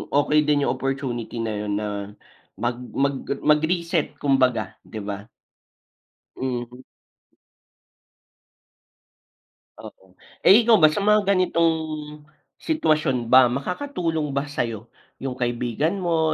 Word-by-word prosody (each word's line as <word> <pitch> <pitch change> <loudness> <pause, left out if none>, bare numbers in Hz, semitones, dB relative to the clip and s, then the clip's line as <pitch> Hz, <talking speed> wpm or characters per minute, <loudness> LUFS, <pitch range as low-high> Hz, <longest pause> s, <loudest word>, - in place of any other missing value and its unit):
okey 150 +1 +3
din 145 -1 +3
yung - - +1
opportunity 125 -4 -3
na 110 -1 -2
yun 105 0 -3
na 105 0 -2 0.7
mag 120 +4 -2 0.2
mag 140 0 +1 0.3
mag 150 0 +5
reset 170 -3 -1
kumbaga, 135 -4 +1
'di 110 - -8
ba? 100 +1 -6 1.1
Mhm. 125 -1 -4 3.0
Oo. 95 -1 -14 0.3
Eh, 220 +5 +7
ikaw 230 - +7
ba, 155 -1 +7
sa 155 - -2
mga 210 +1 +3
ganitong 175 -3 +3 0.9
sitwasyon 155 - +1
ba 130 -1 +7
makakatulong 165 - -2
ba 140 +1 0
sayo 115 -6 -4 0.4
yung 135 -1 -3
kaibigan 120 - -1
mo, 165 -3 +1
140 Hz, 110 wpm, -23 LUFS, 120-165 Hz, 3.0 s, Eh